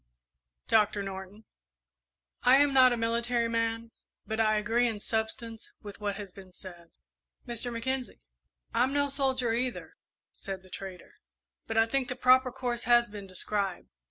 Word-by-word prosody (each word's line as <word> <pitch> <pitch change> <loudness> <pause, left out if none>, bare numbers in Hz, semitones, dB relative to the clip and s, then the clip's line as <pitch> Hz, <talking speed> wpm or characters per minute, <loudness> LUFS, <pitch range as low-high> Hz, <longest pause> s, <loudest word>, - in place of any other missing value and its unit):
"Doctor 210 -2 +3
Norton?" 195 +2 -8 1.0
"I 250 +1 +6
am 285 0 +4
not 255 -1 +7
a 240 - 0
military 235 +1 0
man, 230 0 -1 0.3
but 220 +1 -3
I 215 -1 +3
agree 225 +3 +2
in 220 -3 -3
substance 225 +1 -4
with 205 0 -9
what 205 -1 -1
has 200 -2 -8
been 190 -2 -13
said." 175 -2 -12 0.6
"Mr. 240 0 -1
Mackenzie?" 250 - -3 0.5
"I'm 260 +2 +2
no 285 0 +2
soldier, 265 -4 0
either," 245 +1 -3 0.4
said 190 -1 -7
the 185 - -19
trader, 190 -2 -9 0.5
"but 225 - -3
I 225 - +6
think 260 +2 -1
the 250 - -3
proper 255 0 +4
course 245 -2 -3
has 240 -1 +5
been 205 -2 -8
described. 190 0 -2
230 Hz, 155 wpm, -29 LUFS, 205-245 Hz, 1.0 s, not